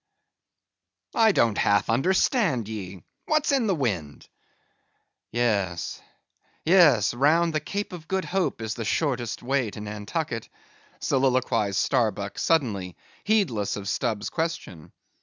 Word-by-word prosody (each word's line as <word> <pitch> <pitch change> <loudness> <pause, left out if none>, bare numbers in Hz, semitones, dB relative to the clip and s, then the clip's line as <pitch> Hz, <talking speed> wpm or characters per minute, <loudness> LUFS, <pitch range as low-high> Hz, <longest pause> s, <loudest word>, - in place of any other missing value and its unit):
"I 225 -1 +5
don't 115 - +2
half 100 -1 +3
understand 150 - +2
ye: 95 -5 -7 0.2
what's 310 -1 +2
in 265 -5 +2
the 195 - +2
wind?" 95 - -3 1.0
"Yes, 100 -8 -1 0.6
yes, 155 - +5
round 160 +6 +3
the 155 - +1
Cape 200 +6 -4
of 165 -2 -9
Good 190 0 -1
Hope 185 -11 -1
is 110 0 -2
the 115 - -5
shortest 120 -3 -1
way 130 -2 0
to 105 - -9
Nantucket," 105 +5 -4 0.5
soliloquized 130 -7 +1
Starbuck 105 -3 0
suddenly, 105 - 0 0.3
heedless 170 - +1
of 100 -1 -6
Stubb's 105 0 -2
question. 160 - -4
120 Hz, 120 wpm, -25 LUFS, 105-165 Hz, 1.0 s, I